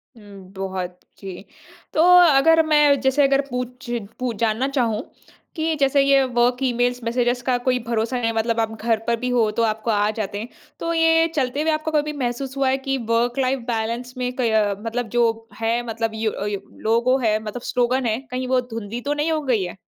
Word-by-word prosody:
हुँ, 200 -3 -14
बहुत, 185 -2 -5 0.2
जी। 190 0 -8 0.5
तो 315 - +3 0.3
अगर 325 +4 +5
मैं, 295 -3 +4
जैसे 265 +2 +3
अगर 275 0 +3
पूछ 250 0 -5 0.3
पू 250 -1 -1
जानना 225 +4 +1
चाहूँ 235 -5 0 0.5
कि 320 0 0
जैसे 275 0 +3
ये 275 -1 +4
वर्क़ 245 +1 +1
ईमेल्स, 245 0 0
मेसेजेस 245 +1 0
का 250 -1 +1
कोई 250 -1 +3
भरोसा 235 +2 -1
नहीं, 230 0 +1
मतलब 225 +1 0
आप 225 0 0
घर 225 -1 +1
पर 235 - +2
भी 250 0 -2
हो, 235 -3 +2
तो 230 +2 0
आपको 220 +1 -1
आ 205 0 +2
जाते 205 0 -3
हैं। 225 - -5 0.3
तो 335 0 -2
ये 325 0 +4
चलते 275 +1 0
हुए 320 0 +1
आपको 310 +1 -2
कभी 300 0 0
महसूस 260 +1 -3
हुआ 270 -1 +2
है 265 - +1
कि 270 0 -2
वर्क़ 240 +2 +1
लाइफ़ 260 +1 0
बैलेंस 235 +2 -3
में 250 0 -2
कई 245 -3 0
अ, 210 -2 +2
मतलब 230 0 -3
जो 225 -1 +1
है, 230 +2 0
मतलब 225 0 -2
यो 220 0 -1
अ, 200 - -5
यो 200 -1 -2 0.2
लोगो 235 +4 +2
है, 215 0 +3
मतलब 215 +3 -6
स्लोगन 250 +1 +1
है, 225 +1 0
कहीं 255 0 -3
वो 255 0 +2
धुँधली 230 -1 -6
तो 285 +3 -1
नहीं 300 +2 -1
हो 310 -1 0
गई 245 -8 +1
है? 180 +2 -6
245 Hz, 210 wpm, -22 LUFS, 225-270 Hz, 0.5 s, अगर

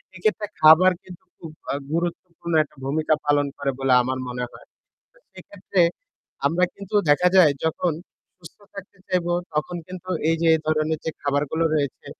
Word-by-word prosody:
এক্ষেত্রে 210 +3 -1 0.2
খাবার 160 +4 +7
কিন্তু 180 -2 -13
খুব 165 -2 -10 0.2
আ - - -1 0.2
গুরুত্বপূর্ণ 170 0 -4
একটা 150 - -20
ভূমিকা 155 +3 +1
পালন 145 -1 +2
করে 140 -1 -1
বলে 135 -1 +2
আমার 130 +1 -3
মনে 125 0 -4
হয়। - - -15 0.5
তো - - -26 0.2
সেক্ষেত্রে 195 -1 -3 0.7
আমরা 170 +5 +2
কিন্তু 200 0 -10 0.2
দেখা 180 +5 +4
যায় 160 -6 +7
যখন 160 +1 0 0.5
সুস্থ 165 - -14 0.2
থাকতে 195 0 -11
চাইব 180 -2 0 0.3
তখন 150 +4 -2
কিন্তু 185 0 -9 0.2
এই 165 - +2
যে - - +2
এই 160 - 0
ধরনের 155 0 0
যে 160 - -1
খাবারগুলো 145 +3 0
রয়েছে 140 -3 -2
160 Hz, 160 wpm, -23 LUFS, 145-180 Hz, 0.7 s, খাবার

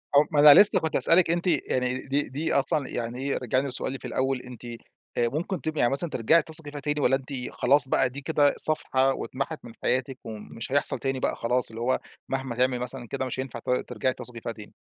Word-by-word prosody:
أو 145 - +8
ما 150 - +1
أنا 145 -1 +10
لسه 205 0 +8
كنت 160 - -3
هاسألِك 170 0 +4
أنتِ 175 +2 -1
يعني 130 -5 -1
دي 140 +2 +1
دي 150 +5 -2
أصلًا 140 0 0
يعني 120 +1 -4
إيه 140 +1 -2
رجعيني 130 +3 -1
لسؤالي 135 0 -3
في - - -11
الأول 130 -1 -1
أنتِ 125 -1 -12
آآ 120 0 -5
ممكن 165 +6 -3
تبقى 155 -1 -3
يعني 120 - +3
مثلًا 140 +5 0
ترجعي 150 +6 +3
تثقي 155 -2 -5
فيها 145 - -7
تاني؟ 150 +1 -2
والّا 135 -1 +3
أنتِ 135 +1 -7 0.2
خلاص 145 0 +3
بقى 130 - +2
دي 140 +3 -8
كده 145 0 +2
صفحة 135 -3 +2
واتمحت 135 +6 -5
من - - -10
حياتِك، 130 +1 -1
ومش 110 +2 -8
هيحصل 145 +1 +3
تاني 135 -1 -2
بقى - - -1
خلاص، 125 +1 0
اللي 115 +1 -8
هو 130 +2 +1 0.3
مهما 130 -2 -3
تعمل 125 0 +1
مثلًا 125 0 -6
كده 130 +2 -3
مش 130 0 -5
هينفع 130 -3 -5
ت - - -9
ترجعي 125 0 -1
تثقي 120 -2 -9
فيها 115 - -4
تاني؟ 105 -2 -13
135 Hz, 220 wpm, -26 LUFS, 125-145 Hz, 0.3 s, أنا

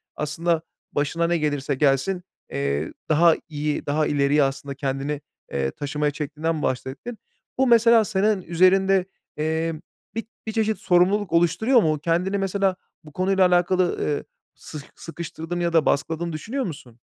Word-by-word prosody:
aslında 160 +2 0 0.3
başına 165 +4 0
ne 170 0 +2
gelirse 145 -2 -1
gelsin, 145 +7 +1 0.3
eee, 70 +2 -2 0.2
daha 165 +1 +5
iyi 150 0 -2
daha 145 0 -1
daha 155 - +3
ileriye 145 0 +3
aslında 135 0 -3
kendini, 140 +2 -3 0.3
eee, 65 -1 -1
taşımaya 150 0 -2
çektiğinden 155 +1 -3
bahsettin. 130 - -3 0.4
Bu 265 - +3
mesela 230 -1 +6
senin 205 -1 +1
üzerinde, 185 +2 +3 0.3
eee, 160 +2 -1 0.4
bir 225 - -3 0.2
bir - - -1
çeşit 220 -1 0
sorumluluk 185 +1 +2
oluşturuyor 220 - +4
mu? 155 -5 +1
Kendini 175 +5 0
mesela 195 0 0 0.3
bu 150 - -13
konuyla 190 +2 +3
alakalı, 180 0 +2
eee, 145 - -1 0.3
sıh 150 - -9
sıkıştırdığını 170 +1 -5
ya 170 -1 0
da 160 -2 +4
baskıladığını 165 +3 0
düşünüyor 240 - -3
musun? 130 - -9
165 Hz, 145 wpm, -24 LUFS, 145-190 Hz, 0.4 s, mesela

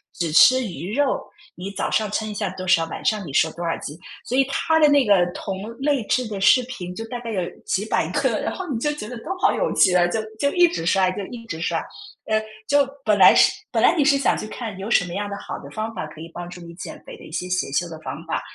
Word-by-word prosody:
只 170 -2 -2
吃 255 +10 +6
鱼 180 +4 -5
肉， 285 -2 0 0.3
你 185 +3 -6
早 200 - -3
上 215 -2 +1
称 215 +1 -1
一 210 - -5
下 205 - -2
多 185 0 -7
少， 165 -2 +4
晚 - - -7
上 210 -3 +1
你 145 - -7
说 160 +2 +3
多 170 +2 -7
少 165 -1 -1
斤。” 145 - -7 0.3
所 255 - -2
以 270 - +5
他 320 +4 +1
的 300 - +6
那 285 -2 +4
个 190 -4 +4
同 190 -1 -5 0.2
类 280 -3 +1
制 255 -2 +1
的 205 -3 -5
视 250 +6 +6
频 185 -8 -7
就 225 - -5
大 240 +1 -6
概 235 -1 -6
有 195 -4 -1 0.3
几 205 +3 -1
百 - - 0
个， - - +1
然 - - -2
后 375 - -5
你 260 -8 -2
就 295 +5 0
觉 255 -8 -7
得 245 - -7
都 - - -15
好 - - +3
有 - - 0
趣 185 - +5
啊， 175 -1 +4
就 220 +5 -1 0.2
就 280 - +2
一 355 -1 +6
直 170 - -3
刷 190 0 +3
就 200 +1 -5
一 230 -2 -9
直 160 -6 -6
刷。 - - -1 0.4
呃， 215 0 +2 0.3
就 285 -1 +3 0.2
本 215 -3 +3
来 195 - +8
是 - - +6 0.2
本 - - +1
来 - - +6
你 290 - +3
是 280 -1 +5
想 275 - +2
去 215 - -5
看 220 -4 -6
有 200 +3 -5
什 180 - +4
么 175 - -7
样 205 +1 -2
的 200 - -4
好 - - -6
的 - - -11
方 220 +1 -4
法 185 - -4
可 155 +1 -12
以 165 - -8
帮 175 0 -7
助 180 0 -10
你 170 0 -10
减 - - -8
肥 - - -10
的 - - -13
一 - - -13
些 180 +3 -4
邪 180 -5 0
修 175 +3 0
的 160 -1 -9
方 - - -6
法， - - -2
205 Hz, 305 characters per minute, -22 LUFS, 180-255 Hz, 0.4 s, 来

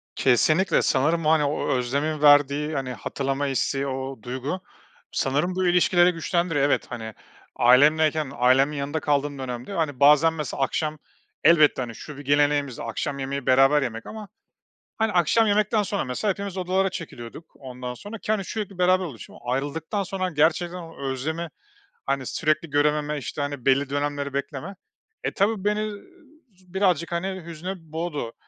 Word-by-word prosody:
Kesinlikle, 155 - +3
sanırım, 155 +5 +1
hani, 155 -1 +4
o 145 +1 -1
özlemin 140 +5 -1
verdiği, 145 +1 +4
hani, 130 -3 -3
hatırlama 135 +5 -2
isteği, 135 +1 -1
o 130 -3 -5
duygu 130 +8 -4 0.5
sanırım 150 +7 0
bu 185 -1 +1
ilişkileri 175 0 +4
güçlendiriyor. 165 -3 0
Evet, 145 - +1
hani, 110 -3 -6 0.4
ailemleyken 150 +3 +4
ailemin 135 +4 +3
yanında 145 +3 -2
kaldığım 145 -1 -1
dönemde, 125 +6 -5
hani, 155 -7 -2
bazen 150 +3 +6
mesela 150 -3 -4
akşam 155 +3 -2 0.5
elbette, 155 -4 +5
hani, 115 -3 -5
şu 150 -2 -10
bir 145 - -10
geleneğimizdi, 145 -2 +1
akşam 140 +5 -3
yemeği 135 0 -4
beraber 135 +3 +5
yemek 115 -3 -4
ama, 215 -2 -8 0.7
hani, 220 -1 +1
akşam 185 +5 +3
yemekten 210 +1 +2
sonra 200 0 -2
mesela 125 +12 -2
hepimiz 200 -1 -5
odalara 185 +1 +1
çekiliyorduk, 160 -4 -8
ondan 125 -1 -7
sonra 205 - -9
ki, 215 - -3
hani, 205 -3 0
sürekli 200 -2 -5
beraber 185 +1 +3
oluşum. 130 -9 -10
Ayrıldıktan 145 - -2
sonra 185 -1 -3
gerçekten 170 +3 +1
o 165 -2 -10
özlemi, 155 +5 -3 0.6
hani, 135 -1 -1
sürekli 155 +4 0
görememe, 150 +1 +1
işte, 145 +1 -5
hani, 145 -3 -4
belli 135 +1 +3
dönemleri 145 0 -2
bekleme. 140 +7 -4 0.5
E, - - -1
tabii 200 0 +1
beni 210 +1 0 0.6
z 185 0 -24
birazcık 180 -4 +1
hani 185 0 -3
hüzne 170 +3 -5
boğdu, 160 -6 -5
150 Hz, 150 wpm, -24 LUFS, 135-175 Hz, 0.7 s, bazen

